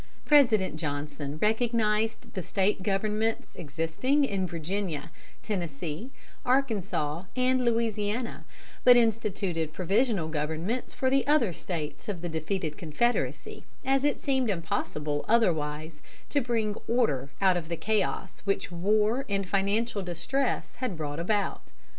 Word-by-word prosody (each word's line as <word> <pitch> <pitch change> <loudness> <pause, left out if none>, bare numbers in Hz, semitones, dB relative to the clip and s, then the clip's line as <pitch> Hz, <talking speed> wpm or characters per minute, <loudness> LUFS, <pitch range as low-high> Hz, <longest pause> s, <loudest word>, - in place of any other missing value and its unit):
] - - -32
President 225 - +5
Johnson 145 -1 -4
recognized 220 0 +1
the 185 - -3
State 195 +2 +1
governments 210 +3 0
existing 165 - 0
in 195 -6 -1
Virginia, 170 -1 -3 0.3
Tennessee, 170 - -3 0.3
Arkansas, 200 - 0
and 255 0 +2
Louisiana, 230 0 0 0.4
but 245 -1 +9
instituted 200 -8 0
provisional 195 0 +1
governments 160 +10 -2
for 260 -1 +1
the 270 -2 +2
other 285 - +3
States 155 -1 -5
of 185 -5 -3
the 175 - -2
defeated 160 0 -2
Confederacy, 180 +10 -1 0.2
as 270 0 +3
it 290 -1 +1
seemed 265 -4 +1
impossible 150 -5 -1
otherwise 155 -8 +1 0.3
to 285 - +2
bring 230 -4 0
order 150 - +1
out 190 -2 +4
of 170 -2 -3
the 170 - -2
chaos 215 +6 -1
which 195 -1 -1
war 210 +8 +2
and 195 -1 0
financial 200 +3 +1
distress 185 +10 -1
had 250 -9 -3
brought 150 -1 -3
about. 200 +3 0
200 Hz, 125 wpm, -28 LUFS, 165-230 Hz, 0.4 s, but